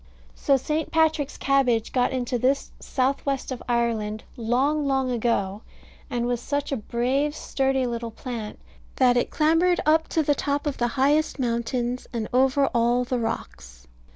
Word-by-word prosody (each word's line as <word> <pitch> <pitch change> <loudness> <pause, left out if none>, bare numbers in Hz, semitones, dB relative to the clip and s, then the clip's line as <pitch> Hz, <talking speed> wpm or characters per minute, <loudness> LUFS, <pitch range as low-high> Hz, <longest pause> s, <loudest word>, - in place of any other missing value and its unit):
So 275 - +2
St. 305 +4 -2
Patrick's 315 -3 +1
cabbage 250 -5 +2
got 250 -1 +1
into 250 -1 -1
this 270 +3 +1
south 265 +1 -1
west 275 -1 -2
of 255 - -5
Ireland, 225 -3 0
long, 265 +6 +1
long 265 -2 +1
ago; 215 -4 0 0.5
and 240 -1 -1
was 245 -1 -1
such 285 +1 -2
a 275 - 0
brave 255 +7 -1
sturdy 270 -3 0
little 235 -1 -3
plant, 225 -2 -6 0.4
that 250 -2 +4
it 245 - +1
clambered 330 +3 +3
up 320 +1 +3
to 320 - +1
the 290 - +3
top 285 +1 -2
of 290 -2 -2
the 240 - +2
highest 285 +5 +1
mountains, 240 0 -2
and 225 -3 -3
over 265 +2 +3
all 240 +1 +2
the 250 0 -2
rocks. 60 - -5
255 Hz, 160 wpm, -25 LUFS, 235-280 Hz, 0.5 s, that